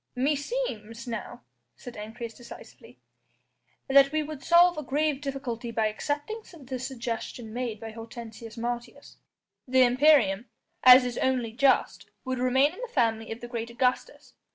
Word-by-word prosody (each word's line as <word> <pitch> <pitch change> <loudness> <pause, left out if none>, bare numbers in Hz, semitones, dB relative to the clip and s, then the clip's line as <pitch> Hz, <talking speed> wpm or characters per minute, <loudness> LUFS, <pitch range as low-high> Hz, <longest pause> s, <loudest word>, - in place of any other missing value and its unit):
"Meseems," 265 - -2
now 230 - -6 0.3
said 245 - -10
Ancyrus 225 +2 -7
decisively, 240 +1 -13 0.9
"that 275 0 +6
we 310 0 0
would 300 -2 -8
solve 350 +1 +5
a - - -3
grave 290 +1 -1
difficulty 265 -4 -4
by 225 -1 0
accepting 290 - -3 0.2
the 260 -2 -6
suggestion 235 -3 -5
made 240 -3 -3
by 225 0 -7
Hortensius 225 0 -10
Martius. 240 +1 -6 0.5
The 260 0 +5
imperium 245 -5 +4 0.4
as 255 0 +9
is 245 -1 -3
only 250 -3 0
just 270 +3 +1 0.2
would 260 -1 -2
remain 265 +4 +3
in 385 - -11
the - - -4
family 225 -3 0
of 225 - -6
the 240 - -7
great 235 -1 -5
Augustus. 250 - -2
250 Hz, 145 wpm, -27 LUFS, 230-275 Hz, 0.9 s, as